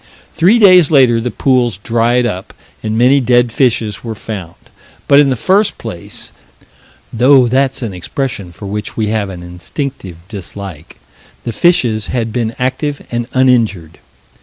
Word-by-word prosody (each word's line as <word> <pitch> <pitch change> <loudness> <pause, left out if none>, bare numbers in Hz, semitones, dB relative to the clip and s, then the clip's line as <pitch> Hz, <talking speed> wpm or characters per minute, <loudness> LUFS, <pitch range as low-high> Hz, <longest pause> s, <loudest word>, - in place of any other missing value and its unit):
Three 190 +8 +4
days 185 -7 +6
later 125 -6 +4
the 125 - -2
pools 120 -2 +1
dried 120 +4 +1
up 95 -5 -5 0.3
and 110 0 -2
many 130 +4 +4
dead 120 -2 +2
fishes 115 -5 0
were 115 -2 -5
found, 100 -6 -7 0.5
but, 140 0 +6
in 145 -2 +4
the 130 - +1
first 195 - +1
place 105 -7 -7 0.8
though 130 +2 +5
that's 130 +2 0
an 110 -4 -4
expression 100 +1 -4
for 85 +4 -11
which 105 +2 -5
we 110 -2 0
have 105 -2 -1
an 90 -2 -8
instinctive 90 - -6
dislike 95 -4 -9 0.5
the 115 - -4
fishes 120 -9 +2
had 115 -3 -2
been 115 -2 -2
active 135 +3 -2
and 120 0 -2
uninjured. 115 -11 +1
120 Hz, 150 wpm, -14 LUFS, 105-130 Hz, 0.8 s, days